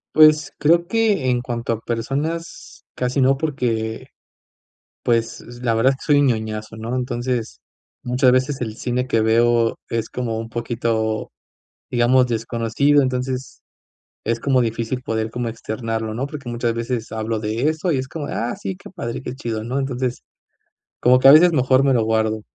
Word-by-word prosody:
Pues, 155 -1 +6
creo 170 +3 +3
que 215 - +1
en 125 -1 +2
cuanto 120 -1 -3
a 115 - -1
personas 145 +9 -4
casi 125 +2 0
no 135 +1 +4
porque, 120 -7 -2 1.0
pues, 115 -1 0 0.2
la 120 -2 +1
verdad 115 +4 +4
es - - -11
que 150 - +3
soy 145 0 +5
ñoñazo, 110 -4 -1
¿no?, 115 +2 -4
entonces, 120 - -3 0.4
muchas 125 +1 +3
veces 130 +2 +1
el 110 -3 -4
cine 125 +1 -2
que 115 -4 +2
veo 115 +1 +3
es 115 -1 -2
como 115 -3 -3
un 115 0 -5
poquito, 115 -2 -2 0.6
digamos 125 +1 +4
desconocido, 115 +5 +1
entonces, 130 0 -3 0.6
es 115 0 -1
como 135 +1 +2
difícil 115 +1 -2
poder 110 -1 -2
como 120 0 -3
externarlo, 110 -1 -4
¿no?, 125 +4 -2
porque 140 -4 -7
muchas 120 0 -1
veces 115 0 -3
hablo 110 0 -2
de 110 +6 0
eso 160 +3 -1
y 135 - +1
es 130 - -4
como: 150 +1 -5
"Ah, 115 -2 -3
sí 95 -1 -4
que - - -13
padre 115 +2 -5
que 130 - -6
chido", 115 -4 -4
¿no?, 125 +4 -3
entonces, 130 -2 -2 0.8
como 125 +1 +5
que 130 - +3
a 135 - +11
veces 170 +4 +7
mejor 130 -2 +3
me 135 -1 +3
lo 115 -3 +2
guardo, 110 -1 0
120 Hz, 170 wpm, -21 LUFS, 115-135 Hz, 1.0 s, a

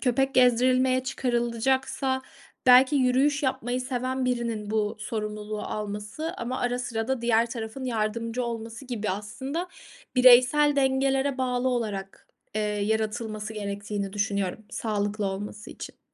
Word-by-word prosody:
köpek 270 +1 +1
gezdirilmeye 255 +1 +4
çıkarılacaksa 260 +2 0 0.4
belki 255 +3 +7
yürüyüş 275 +3 +3
yapmayı 255 -2 -1
seven 255 0 -2
birinin 235 -4 -2
bu 215 0 0
sorumluluğu 210 -1 -4
alması. 210 +9 -4
Ama 250 +2 -3
ara 245 0 0
sıra 235 -1 -3
da 265 -3 0
diğer 230 0 +3
tarafın 230 +2 -5
yardımcı 230 +1 -1
olması 230 +2 -5
gibi, 225 -5 -3
aslında, 265 - -4 0.5
bireysel 255 +4 +6
dengelere 270 0 +2
bağlı 255 0 0
olarak, 210 -6 -3 0.3
eee, 215 - 0
yaratılması 215 +1 -2
gerektiğini 205 -1 -4
düşünüyorum 200 -1 -1
sağlıklı 210 -1 -1
olması 205 +2 -5
için. - - -9
235 Hz, 120 wpm, -26 LUFS, 215-260 Hz, 0.5 s, belki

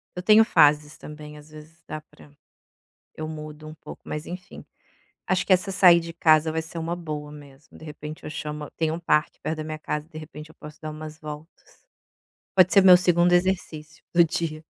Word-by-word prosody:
Eu 180 - -5
tenho 215 +3 +6
fases 150 -5 +3
também, 150 0 -11
às 150 +1 -15
vezes 155 +2 -15
dá 155 - -6
pra 75 - -20 0.8
eu 155 - -5
mudo 155 -1 -9
um 155 - -9
pouco 155 - -12
mas, 150 +1 -5
enfim. 180 +1 -9 0.6
Acho 185 - +1
que - - -2
essa 185 +2 +1
"sair 180 -2 +6
de 165 0 -8
casa" 160 -1 +4
vai 160 0 -2
ser 160 +1 -9
uma 165 +1 -3
boa 150 -4 -6
mesmo, 145 -1 -15
de - - -14
repente 150 0 -9
eu - - -6
chamo 150 0 -6
tem 160 -1 0
um 165 - -4
parque 150 -2 0
perto 160 - -3
da 155 - -4
minha 155 0 -5
casa, 150 0 -4
de 160 -2 -12
repente 155 0 -10
eu - - -24
posso 150 0 -12
dar 155 - -5
umas 155 0 -9
voltas. 155 +1 -11 0.7
Pode 185 -1 +5
ser 195 - +6
meu 185 -1 +9
2º 175 -1 +3
exercício 175 -4 -1
do 170 0 +6
dia. 160 -1 -3
155 Hz, 205 wpm, -24 LUFS, 150-170 Hz, 0.8 s, meu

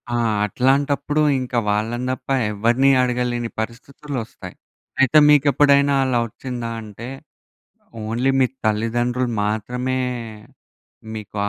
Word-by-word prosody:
ఆ! - - +1 0.3
అట్లాంటప్పుడు 140 +6 +1 0.2
ఇంకా 125 -1 -3
వాళ్ళని 115 +4 -1
తప్ప 130 - -7 0.2
ఎవరిని 120 +6 +2
అడగలేని 120 -1 -1
పరిస్థితులొస్తాయి. 125 +1 -7 0.5
అయితే 135 +4 +5
మీకు 145 -1 +5
ఎప్పుడైనా 140 0 +4
అలా 125 -2 +1
ఒచ్చిందా 120 0 -6
అంటే 110 +3 -9 1.0
ఓన్లీ 120 +5 0
మీ 130 - +5 0.2
తల్లిదండ్రులు 120 +3 0
మాత్రమే 125 +5 -2 1.2
మీకు 105 -1 -9
125 Hz, 100 wpm, -21 LUFS, 115-135 Hz, 1.2 s, అయితే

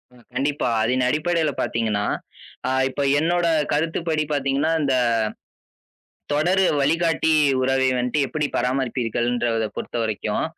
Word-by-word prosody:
ம். 120 - -20
கண்டிப்பா. 140 +1 -1
அதின் 125 +2 +1
அடிப்படையில 155 +1 +1
பார்த்தீங்கன்னா, 110 -3 -1 0.6
ஆ, - - 0 0.2
இப்ப 140 - -4 0.2
என்னோட 170 +2 +1 0.3
கருத்துப்படி 160 +1 0
பார்த்தீங்கன்னா, 140 +2 0
அந்த 140 -2 +1 1.4
தொடர் 175 +6 +2 0.2
வழிகாட்டி 160 +2 +2 0.3
உறவை 130 0 +2
வந்ட்டு 125 +4 -1
எப்பிடி 150 +1 -2
பராமரிப்பீர்கள்ன்றத 120 -2 0
பொறுத்தவரைக்கும், 110 -3 -2
135 Hz, 100 wpm, -22 LUFS, 120-155 Hz, 1.4 s, தொடர்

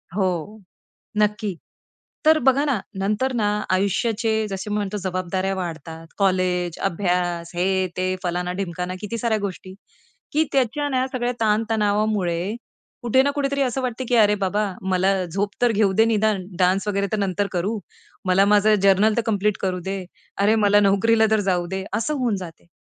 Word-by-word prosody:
हो, 190 +1 -2 0.6
नक्की. 210 -3 0 0.7
तर 315 0 +6
बघा 275 +3 +3
ना, 265 -9 0 0.2
नंतर 215 +7 0
ना 215 -3 +1 0.3
आयुष्याचे 220 +3 +1
जसे 195 +2 -5
म्हणतो 210 -1 -2
जबाबदाऱ्या 185 +1 -1
वाढतात. 165 -2 -6
कॉलेज, 180 -3 +1
अभ्यास, 175 -2 -1
हे, 190 +1 +1
ते, 185 0 0
फलाना, 180 0 -1
ढिमकाना, 180 -1 -4
किती 230 +2 -4
साऱ्या 220 -1 0
गोष्टी, 190 -1 -6 0.6
की 310 +2 +3
त्याच्या 275 +2 +1
ना 260 -1 0
सगळ्या 245 -1 -1
ताणतणावामुळे 210 -4 +1 0.5
कुठे 240 +2 +4
ना 285 - +1
कुठेतरी 280 -1 0
असं 260 +1 -1
वाटतं, 255 0 -3
की 245 - +1
"अरे 210 -2 +5
बाबा 205 +3 +1 0.3
मला 190 +1 +2
झोप 200 +4 -2
तर 240 - +4
घेऊ 205 -2 +2
दे 220 +4 +4
निदान, 215 -4 +1
डान्स 185 +3 +2
वगैरे 200 -1 0
तर 215 - 0
नंतर 200 0 0
करू. 195 +5 -1 0.5
मला 185 +2 +4
माझं 210 +1 +5
जर्नल 200 +2 +4
तर 235 - +2
कंप्लीट 210 -1 +1
करू 185 -2 -1
दे. 190 -1 -3 0.4
अरे 215 +2 +4
मला 205 0 +5
नोकरीला 220 +3 +3
तर 220 -1 +3
जाऊ 175 -1 0
दे." 190 +2 -4
असं 300 +7 0
होऊन 235 -5 0
जाते 165 -1 -11
200 Hz, 160 wpm, -22 LUFS, 185-220 Hz, 0.7 s, तर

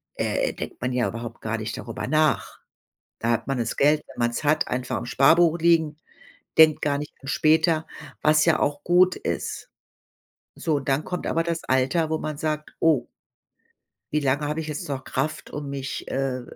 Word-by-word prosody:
äh, - - 0
denkt - - -7
man 125 +1 -1
ja 125 -1 +1
überhaupt 115 0 -7
gar 115 +1 -2
nicht 110 0 -5
darüber 115 +1 -5
nach. 155 -2 +1 0.6
Da 115 - 0
hat 115 - -1
man 135 -2 -1
das 115 -1 -2
Geld, 150 +2 +4
wenn - - -13
man's 120 +4 0
hat, 155 +2 +2
einfach 125 0 -2
im - - -5
Sparbuch 165 +6 +4
liegen, 160 -2 +3 0.6
denkt 155 -1 +7
gar 145 -1 +1
nicht 150 +1 -6
später, 160 +3 +2 0.4
was 155 0 +4
ja 165 -2 +3
auch 145 0 -1
gut 180 +1 +4
ist. 460 - -4 0.9
So, 155 -4 0
dann 135 +3 0
kommt 180 - -4
aber 165 - +1
das 170 -1 -2
Alter, 135 +5 +1
wo 160 - 0
man 155 -1 -4
sagt: 155 0 -3
„Oh, 150 -7 +3 1.0
wie 150 - +1
lange 140 +2 0
habe 150 +2 -2
ich 155 - -6
jetzt 150 -1 -5
noch 135 -1 -3
Kraft, 155 - -3
um 145 -1 -5
mich, 140 -1 -5
äh, 130 -2 -1
150 Hz, 180 wpm, -24 LUFS, 130-160 Hz, 1.0 s, denkt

